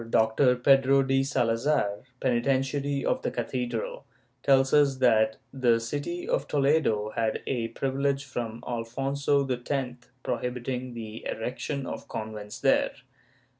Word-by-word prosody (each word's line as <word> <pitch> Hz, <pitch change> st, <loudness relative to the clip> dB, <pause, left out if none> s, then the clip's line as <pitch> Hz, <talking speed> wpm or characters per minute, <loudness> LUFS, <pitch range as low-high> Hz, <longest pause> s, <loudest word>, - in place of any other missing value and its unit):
Doctor 115 Hz, +4 st, +3 dB
Pedro 135 Hz, +1 st, +4 dB
de 135 Hz, 0 st, +2 dB
Salazar, 115 Hz, -4 st, +1 dB, 0.2 s
penitentiary 135 Hz, +3 st, 0 dB
of -, -, +1 dB
the -, -, -1 dB
cathedral, 120 Hz, -1 st, -3 dB, 0.4 s
tells 135 Hz, -1 st, +3 dB
us 145 Hz, -2 st, +5 dB
that 110 Hz, -4 st, +3 dB, 0.2 s
the 120 Hz, -4 st, +3 dB
city 145 Hz, +9 st, -4 dB
of 140 Hz, -, 0 dB
Toledo 135 Hz, -7 st, +2 dB
held 110 Hz, -1 st, 0 dB
a 120 Hz, -3 st, -1 dB
privilege 135 Hz, +3 st, -1 dB
from 120 Hz, -4 st, -5 dB
Alfonso 135 Hz, +4 st, 0 dB
X 125 Hz, -1 st, -3 dB
prohibiting 125 Hz, 0 st, -3 dB
the 110 Hz, -1 st, -7 dB
erection 130 Hz, +4 st, -3 dB
of -, -, -6 dB
convents 105 Hz, -1 st, -6 dB
there. -, -, +3 dB
125 Hz, 120 wpm, -27 LUFS, 115-135 Hz, 0.4 s, us